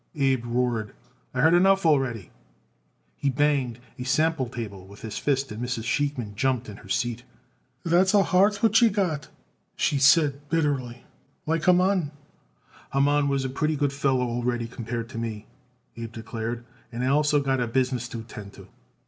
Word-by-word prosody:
Abe 135 -4 +1
roared. 120 -3 -1 0.4
"I 125 - -1
heard 160 +3 +5
enough 190 +1 +4
already." 130 - +1 0.9
He 140 - 0
banged 135 -3 +1 0.2
a - - -3
sample 135 0 +1
table 100 -6 -7
with 100 +1 -14
his 110 -2 -5
fist 135 -3 0
and 105 +2 -6
Mrs. 120 -2 -3
Sheikman 125 -4 -1
jumped 125 +2 0
in 105 -2 -9
her 105 - -15
seat. 120 +2 -1 0.6
"That's 185 +4 +3
a 200 - +6
heart 200 +3 +2
what 225 - +5
you 235 - +6
got 180 -9 -1
it," - - -21 0.5
she 140 - +1
said 145 0 +4
bitterly, 140 -7 -1 0.4
"like 160 +1 0
Haman." 180 -2 +3 0.8
"Haman 145 +1 +3
was 135 -1 0
a - - +1
pretty 155 +4 0
good 145 -1 0
feller 135 -2 +1
already 120 0 -2
compared 115 0 -5
to 130 - -6
me," 110 -2 -5 0.5
Abe 115 -1 -6
declared; 115 +1 -5 0.3
"and 125 +2 -2
also 145 +2 +3
I - - -3
got 120 -3 -2
business 125 -1 0
to 115 -2 -6
attend 105 -3 -10
to." - - -14
130 Hz, 165 wpm, -25 LUFS, 115-150 Hz, 0.9 s, a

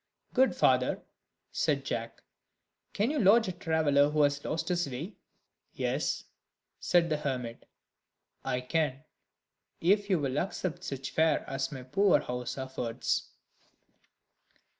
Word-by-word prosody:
"Good 260 +1 +4
father," - - +2 0.5
said - - 0
Jack, - - -4 0.7
"can 215 +7 0
you 305 - 0
lodge 225 +1 +5
a - - -1
traveller 155 -5 +2
who 150 0 +3
has 145 0 +1
lost 160 +2 -2
his 175 -4 0
way?" 150 - -5 0.6
"Yes," - - -1 0.6
said 175 -1 +3
the 155 -2 0
hermit, 125 -5 -4 0.8
"I 125 - -1
can, 140 0 -1 0.8
if 200 +4 +2
you 190 - +4
will 140 -2 -1
accept 180 -2 -3
such 135 -4 -5
fare 160 0 +2
as 135 +2 -2
my 130 -3 -7
poor 190 +5 +3
house 125 -3 -4
affords." 130 -3 -2
150 Hz, 125 wpm, -30 LUFS, 135-180 Hz, 0.8 s, lodge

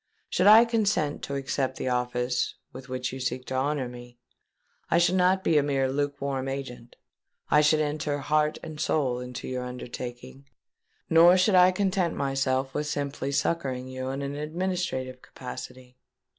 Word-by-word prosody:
Should 185 - +3
I 220 +3 +9
consent 205 -10 0
to 140 - -4
accept 135 -1 -2
the - - -3
office 125 0 -1 0.2
with 130 0 -10
which 125 -1 -3
you 130 - -6
seek 130 0 -3
to - - -6
honour 135 0 0
me, 120 0 -11 0.7
I - - +3
should 175 +1 +3
not 185 +1 +3
be 155 - +4
a - - +3
mere 135 -2 0
lukewarm 140 -1 -2
agent: 130 -3 -6 0.6
I 150 - +6
should 155 +1 +3
enter 150 -1 -1
heart 150 +2 +1
and 155 -1 -8
soul 135 -6 0
into 125 0 -7
your 130 -1 -3
undertaking; 125 +2 -8 0.6
nor 170 +3 +7
should 190 +3 +3
I 180 0 +7
content 185 -2 0
myself 135 -1 -1
with 150 0 -2
simply 140 -2 -3
succouring 135 -4 -1
you 130 0 -5
in 135 +1 -3
an 140 0 -4
administrative 150 -4 -3
capacity. 125 0 -10
140 Hz, 160 wpm, -27 LUFS, 130-155 Hz, 0.7 s, I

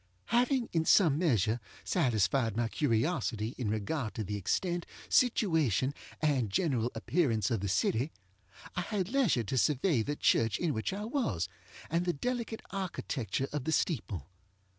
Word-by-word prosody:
Having, 250 0 +2
in 165 -2 +2
some 160 -7 +5
measure, 120 - +2 0.2
satisfied 115 0 +1
my 120 -1 +1
curiosity 115 -4 0
in 120 -5 -1
regard 110 +3 -2
to 110 - -2
the 105 +1 -3
extent, 175 - -1 0.2
situation, 160 - +3 0.3
and 135 -8 +2
general 125 - +1
appearance 120 - +1
of 115 - +1
the 100 - -2
city, 115 - +1 0.6
I 180 - 0
had 190 -1 -2
leisure 235 - +2
to 130 +5 -2
survey 145 0 +2
the 145 +7 -2
church 115 -6 +2
in 170 -4 0
which 110 - -2
I 205 +2 -4
was, 180 - -1 0.4
and 170 +2 0
the 175 - +1
delicate 235 - -3
architecture 140 - -2
of 145 -3 -2
the 160 - 0
steeple. 110 - -1
140 Hz, 150 wpm, -31 LUFS, 110-175 Hz, 0.6 s, some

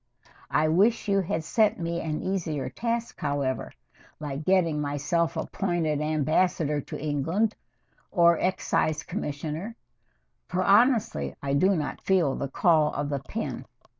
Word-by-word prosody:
I 155 +1 +2
wish 205 +9 +3
you 200 -1 +3
had 170 -3 -2
set 215 +4 +2
me 170 0 -2
an 155 -1 -3
easier 160 -9 -2
task, 235 +3 -3
however, 140 -3 -2 0.5
like 145 -1 -5
getting 170 -5 +2
myself 150 +4 -1
appointed 160 -3 -1
Ambassador 155 0 +1
to - - -7
England, 160 +9 0 0.6
or 170 -2 +4
Excise 160 -4 0
Commissioner, 160 +3 -4 0.7
for 185 +1 -1
honestly 205 - +3
I 140 0 -1
do 185 +8 +3
not 150 -3 -3
feel 175 -8 +2
the 140 - -3
call 155 0 +3
of 145 0 -2
the 140 -1 -1
pen. 205 +12 -5
160 Hz, 135 wpm, -27 LUFS, 150-190 Hz, 0.7 s, or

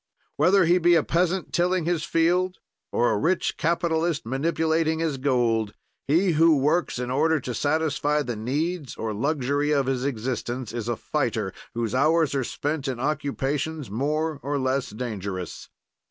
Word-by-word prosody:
"Whether 180 +5 +4
he 175 +2 +4
be 175 0 +5
a 160 - +4
peasant 180 +2 0
tilling 180 -1 +1
his 170 -2 0
field 180 +3 +1 0.3
or 120 - +2
a 105 - +1
rich 180 - +1
capitalist 165 -2 0
manipulating 160 +4 0
his 160 -4 -1
gold, 120 -5 +1 0.3
he 175 +6 +3
who 160 0 +5
works 150 +5 +1
in 125 0 -3
order 155 +4 +2
to 125 - -4
satisfy 150 +1 0
the 120 -4 -4
needs 145 +7 -2
or 110 -1 -3
luxury 145 +4 0
of 140 -3 +2
his 130 -1 -1
existence 125 -2 -3
is 120 -2 -4
a 120 - 0
fighter 110 -8 -2 0.2
whose 115 -2 -2
hours 155 +3 +3
are 135 -2 0
spent 145 +3 -3
in 130 -3 -3
occupations 145 -1 -2
more 150 +6 -1
or 145 +2 -2
less 130 0 0
dangerous. 100 -6 -5
145 Hz, 155 wpm, -25 LUFS, 125-160 Hz, 0.3 s, be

